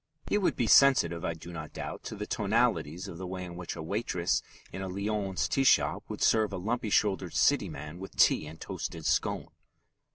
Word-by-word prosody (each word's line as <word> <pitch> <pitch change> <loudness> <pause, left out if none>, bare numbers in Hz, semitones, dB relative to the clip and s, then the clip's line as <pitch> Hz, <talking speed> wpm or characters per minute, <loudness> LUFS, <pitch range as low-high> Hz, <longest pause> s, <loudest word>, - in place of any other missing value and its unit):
He 205 - +2
would 190 - +1
be 120 - 0
sensitive, 100 -11 +5
I 85 - -2
do 85 +2 -10
not 80 -2 -7
doubt, - - -6
to - - -5
the 105 0 -5
tonalities 100 -6 0
of 85 -3 -8
the 95 - -5
way 90 0 -5
in 85 -1 -8
which 90 -1 -5
a - - -6
waitress 90 -1 0 0.3
in 95 - -5
a 95 - -3
Lyons 100 0 -1
tea 135 - +1
shop - - +3
would - - -3
serve 110 -2 +3
a 100 - -4
lumpy 115 +4 -2
shouldered 100 -2 +1
City - - +3
man 75 +4 -8
with 95 - -9
tea 75 - +4
and 80 +1 -10
toasted - - -6
scone. - - 0
95 Hz, 205 wpm, -29 LUFS, 85-110 Hz, 0.3 s, sensitive